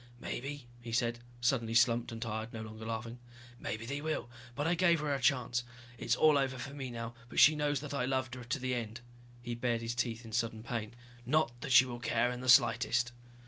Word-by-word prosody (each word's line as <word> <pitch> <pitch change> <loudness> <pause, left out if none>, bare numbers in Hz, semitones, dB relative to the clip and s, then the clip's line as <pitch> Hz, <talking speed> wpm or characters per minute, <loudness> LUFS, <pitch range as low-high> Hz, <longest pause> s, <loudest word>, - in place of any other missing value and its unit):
"Maybe," 140 +2 -5 0.2
he 120 -1 -7
said, 120 0 0 0.2
suddenly 120 -2 +1
slumped 120 0 +3
and 115 - -6
tired, 110 0 -4
no 110 -1 -5
longer 110 0 -8
laughing. 115 +1 -4 0.4
"Maybe 110 +1 -4
they 140 +4 -3
will. 155 -6 -3 0.2
But 145 - -1
I 165 - +3
gave 170 -1 +4
her 150 0 -2
her 135 - -1
chance. 120 -2 +2 0.4
It - - -6
is - - +3
all 155 -2 +5
over 135 -1 -1
for 140 +2 -6
me 135 -3 -5
now, 115 -1 -5 0.2
but - - -1
she 155 +7 +8
knows 145 -2 0
that 150 -1 -6
I 135 -3 0
loved 130 -1 -1
her 125 -1 -7
to 120 +4 -2
the 130 -1 -2
end." 115 -1 -4 0.4
He 120 - -3
bared 120 -1 -1
his 115 0 -2
teeth 120 -1 -2
in 110 - -9
sudden 115 0 -1
pain. 115 -1 -4 0.3
"Not 150 +1 +2
that 145 - -4
she 125 +1 +8
will 120 -2 -6
care 120 0 +1
in 125 0 -5
the 130 - -2
slightest." 120 -1 +5
120 Hz, 225 wpm, -33 LUFS, 115-135 Hz, 0.4 s, she